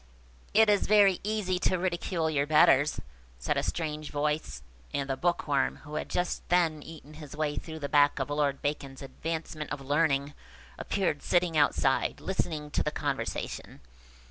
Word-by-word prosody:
"It 220 +1 +7
is 205 -1 +3
very 200 -3 +5
easy 205 -3 -1
to 185 - +1
ridicule 175 -2 -1
your 145 -2 0
betters," 150 -1 +4 0.4
said - - -1
a - - +1
strange 155 -2 -3
voice; 150 - -2 0.3
and 140 -1 -2
the 135 - -1
Bookworm, 145 -2 0
who 150 0 -11
had 155 - -3
just 180 0 -1
then 165 -4 +2
eaten 155 -1 -12
his 150 -2 -10
way 150 -1 -1
through 160 +1 -6
the 145 -2 -4
back 145 0 +4
of 140 +1 -3
Lord 145 -2 0
Bacon's 140 -2 -3
Advancement 155 +1 -5
of 145 - -3
Learning, 140 0 +1 0.5
appeared 185 -7 -1
sitting 175 -2 +1
outside, 140 -2 +2
listening 155 -6 -3
to - - 0
the - - 0
conversation. 150 - -4
150 Hz, 160 wpm, -29 LUFS, 145-175 Hz, 0.5 s, It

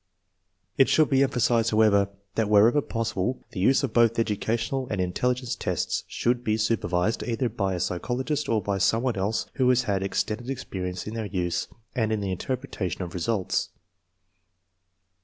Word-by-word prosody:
It 135 - +6
should 155 -2 +3
be 135 0 +4
emphasized, 120 -4 +2
however, 105 -2 +4 0.2
that 110 -2 0
wherever 110 +7 +5
possible 115 -1 -2
the 110 - -6
use 130 +10 +3
of 130 -5 -2
both 115 -1 +4
educational 115 +4 -1
and 100 - -2
in 90 -1 -1
telligence 125 +2 -1
tests - - -2
should 120 0 0
be 110 -2 +1
supervised, 105 -2 0
either 120 +1 -1
by 100 -4 -1
a - - -3
psy 90 0 -1
chologist 130 - -2
or 110 -3 +1
by 100 0 -1
some 110 +5 +2
one 125 -3 0
else 100 +3 -1
who 130 -2 +3
has 125 0 +4
had 100 -4 0
extended 110 +5 -2
experience 90 -8 -4
in 105 - -5
their 110 -2 -3
use 90 -2 -2 0.3
and 110 -4 0
in 110 - 0
the 100 -2 -2
interpretation 100 -3 -3
of 85 - -7
results. 95 +2 -1
110 Hz, 175 wpm, -26 LUFS, 100-125 Hz, 0.3 s, It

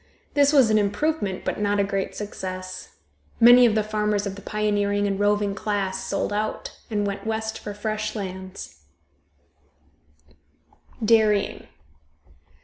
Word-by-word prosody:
This 285 0 +4
was 265 -7 +5
an 215 - +4
improvement, 205 0 -1
but - - -2
not 205 0 +1
a - - +4
great 195 -1 -2
success. 185 -2 -7 0.4
Many 245 +1 +8
of 220 - +1
the 215 - +2
farmers 210 -1 -1
of 200 - -3
the 200 - -10
pioneering 205 -1 0
and 200 -1 -1
roving 205 0 +1
class 195 -2 -2
sold - - -2
out, 215 +1 -3
and 205 -2 -1
went 200 +1 -4
west 220 0 -2
for 205 -1 -7
fresh 215 +1 -3
lands. 190 - -7 2.2
DAIRYING. 215 -2 +2
205 Hz, 135 wpm, -24 LUFS, 200-215 Hz, 2.2 s, Many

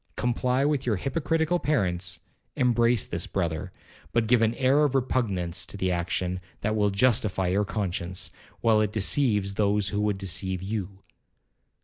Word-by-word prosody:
Comply 125 +2 0
with 145 -3 0
your 110 - +2
hypocritical 160 - 0
parents, 90 - 0 0.3
embrace 120 -2 +3
this 85 0 -3
brother, 85 -1 -2 0.4
but 115 -1 +2
give 120 +1 +3
an 115 +1 +2
air 135 +4 +3
of 140 -2 +1
repugnance 100 -10 0
to - - -6
the 95 -1 0
action 90 +1 -1 0.2
that 110 +1 0
will 105 -1 +2
justify 100 -3 +1
your 100 +3 +1
conscience, 90 -4 -3 0.3
while 110 -2 +4
it 105 -1 0
deceives 105 -2 +1
those 100 -1 +1
who 105 +2 -1
would 105 -1 0
deceive 95 -1 -2
you. 100 -1 -5
105 Hz, 150 wpm, -26 LUFS, 95-125 Hz, 0.4 s, while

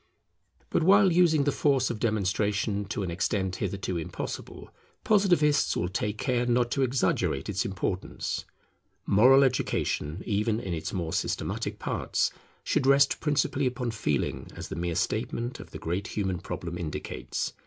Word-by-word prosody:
But - - +2
while 195 +2 +6
using 165 -4 +4
the 145 - +2
force 140 -3 +2
of 115 - -5
demonstration 105 -1 0
to 100 0 -3
an 90 - -3
extent 95 +1 -1
hitherto 95 -2 -2
impossible, 80 - -6 0.3
Positivists 175 -8 +3
will 90 - -1
take 105 +2 -2
care 125 -1 0
not 120 0 +2
to 135 - 0
exaggerate 125 - +1
its 95 -1 -1
importance. 95 -1 -3 0.6
Moral 130 +7 +6
education, 100 - -1
even 105 +1 0
in 95 -7 -4
its 80 -1 -3
more 85 -4 -3
systematic - - -2
parts, - - -1 0.3
should 130 - +1
rest 140 0 +5
principally 145 -2 +1
upon 125 -1 -2
Feeling, 75 - -1
as - - -7
the - - -5
mere 85 0 -2
statement 115 +6 -2
of - - -10
the - - -8
great 90 +5 -3
human 95 -4 -2
problem 85 0 -5
indicates. 80 -3 -4
110 Hz, 150 wpm, -28 LUFS, 95-135 Hz, 0.6 s, while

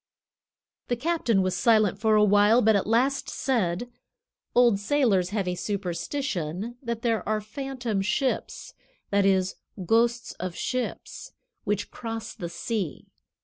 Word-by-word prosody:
The 245 - 0
captain 245 - +1
was 185 -1 0
silent 210 0 +3
for 220 0 +3
a 210 - +5
while, 205 +4 +5
but 220 0 +5
at 200 - 0
last 255 +5 +1
said: 225 -5 -1 0.7
"Old 240 -5 +5
sailors 205 -6 +2
have 200 -2 -2
a 180 - 0
superstition 195 - -3
that 235 -2 -4
there 230 -2 +1
are 215 0 +1
phantom 240 -1 -3
ships 250 +7 -2 0.4
(that 200 -1 +3
is, 190 -1 +1 0.3
ghosts 235 +4 +2
of 180 -1 -4
ships) 255 -1 -4 0.3
which 205 0 -1
cross 225 -1 -6
the 170 - -6
sea. 185 0 -4
215 Hz, 135 wpm, -26 LUFS, 195-240 Hz, 0.7 s, a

